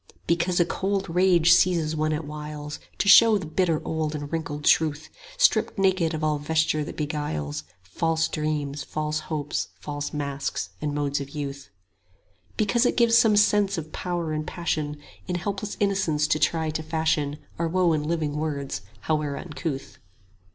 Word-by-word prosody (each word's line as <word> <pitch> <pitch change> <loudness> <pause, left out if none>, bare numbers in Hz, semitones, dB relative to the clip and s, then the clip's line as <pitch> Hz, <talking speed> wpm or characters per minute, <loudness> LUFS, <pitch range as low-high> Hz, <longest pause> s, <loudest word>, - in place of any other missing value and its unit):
Because 170 +1 +1
a 175 - +5
cold 195 +1 -1
rage 175 -1 +4
seizes 170 -3 +3
one 155 0 0
at 155 0 -2
whiles 150 0 -6 0.2
To - - 0
show 220 +2 +8
the 190 - -5
bitter 165 0 +1
old 160 -1 -2
and 145 +1 -6
wrinkled 150 -2 -3
truth 155 -1 +2 0.3
Stripped - - +3
naked 185 -4 +2
of 155 - -4
all 150 -1 +1
vesture 155 0 +1
that - - -8
beguiles, 145 - -3
10 80 +3 -28
False 160 - 0
dreams, 150 -2 -2
false 155 0 -2
hopes, 150 -2 -3
false 145 0 -4
masks 140 -2 -3
and 150 -1 -2
modes 145 -1 -1
of 140 - -6
youth; 140 -3 -6 0.9
Because 230 +3 +2
it - - -1
gives 235 -1 +5
some 220 -3 +5
sense 205 -2 +3
of 155 -1 -6
power 175 -3 -2
and 155 0 -3
passion 155 -4 -2 0.3
In 180 - -2
helpless 200 +3 -3
innocence 190 -7 +1
to 155 - +2
try 160 -1 +1
to 155 - -3
fashion 155 -2 0 0.2
Our 170 - +1
woe 175 0 +2
in 155 - +1
living 150 -1 -1
words 140 -9 -3 0.2
howe'er 150 -2 -1
uncouth. 155 -4 -5
155 Hz, 165 wpm, -25 LUFS, 150-175 Hz, 0.9 s, show